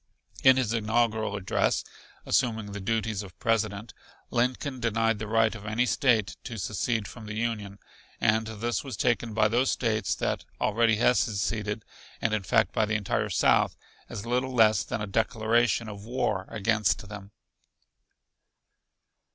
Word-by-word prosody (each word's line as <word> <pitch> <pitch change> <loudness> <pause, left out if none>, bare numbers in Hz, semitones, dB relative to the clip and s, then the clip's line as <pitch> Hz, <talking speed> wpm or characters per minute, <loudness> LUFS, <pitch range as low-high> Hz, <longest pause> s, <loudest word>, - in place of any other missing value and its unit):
In 130 -1 +7
his 120 -4 0
inaugural 110 -1 +1
address, 100 -2 0 0.4
assuming 110 -5 0
the 100 - -5
duties 110 0 -1
of 95 -5 -11
President, 105 -2 -1 0.4
Lincoln 125 +2 -1
denied 115 -2 +1
the 110 - -4
right 110 0 +3
of 110 -2 -9
any 110 +4 +1
State 120 -6 +2
to 120 -4 -6
secede 110 +2 -1
from 110 -3 -10
the 110 - -5
Union, 105 -3 -3 0.4
and 110 +1 +2
this 110 +2 -2
was 130 -7 -6
taken 120 -3 0
by 110 -1 +4
those 120 +4 +2
States 110 -4 0
that - - -2 0.2
already 115 +1 +3
had 120 +3 +3
seceded 105 0 -1 0.3
and 110 - 0
in 110 - +1
fact 95 - +2
by 110 - +2
the 110 - 0
entire 105 -2 -1
South - - +3 0.3
as 100 - -6
little 125 +2 -1
less 110 -3 +5
than 110 - -4
a - - -1
declaration 115 +3 +1
of 100 -1 -8
war 105 -5 -1
against 105 -1 0
them. 100 -1 -9
110 Hz, 150 wpm, -27 LUFS, 105-120 Hz, 0.4 s, In